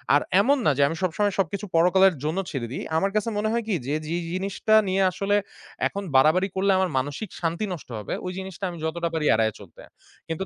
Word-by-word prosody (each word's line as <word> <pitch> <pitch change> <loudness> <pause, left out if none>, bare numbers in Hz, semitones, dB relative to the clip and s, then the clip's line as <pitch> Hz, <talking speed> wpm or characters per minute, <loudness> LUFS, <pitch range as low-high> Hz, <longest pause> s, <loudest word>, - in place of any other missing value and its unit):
আর 145 - +4 0.2
এমন 280 +6 +3
না 150 - +5
যে - - +2
আমি 165 - -3
সবসময় 200 +3 +1
সবকিছু 195 +3 -1
পরকালের 180 +2 +5
জন্য 155 +5 -1
ছেড়ে 125 -5 -3
দেই। - - -4
আমার 195 +3 +1
কাছে 215 +2 +1
মনে 215 +1 0
হয় 235 0 0
কি? 205 - +1
যে, 145 - 0
যেই 170 +1 -2
জিনিসটা 195 +3 +1
নিয়ে 190 +1 +1
আসলে 200 +3 0 0.5
এখন 200 0 -5
বাড়াবাড়ি 160 +8 +5
করলে 195 +1 +2
আমার 190 -1 +1
মানসিক 145 +10 -3
শান্তি 170 +5 -1
নষ্ট 160 - -9
হবে, 105 - -5
ওই 180 - -3
জিনিসটা 190 0 -6
আমি 170 - -8
যতটা 170 +1 -2
পারি 155 -2 -1
এড়ায় 110 -1 +2
চলতে। 95 -5 -14 0.5
কিন্তু 165 +4 -3
180 Hz, 210 wpm, -25 LUFS, 160-200 Hz, 0.5 s, না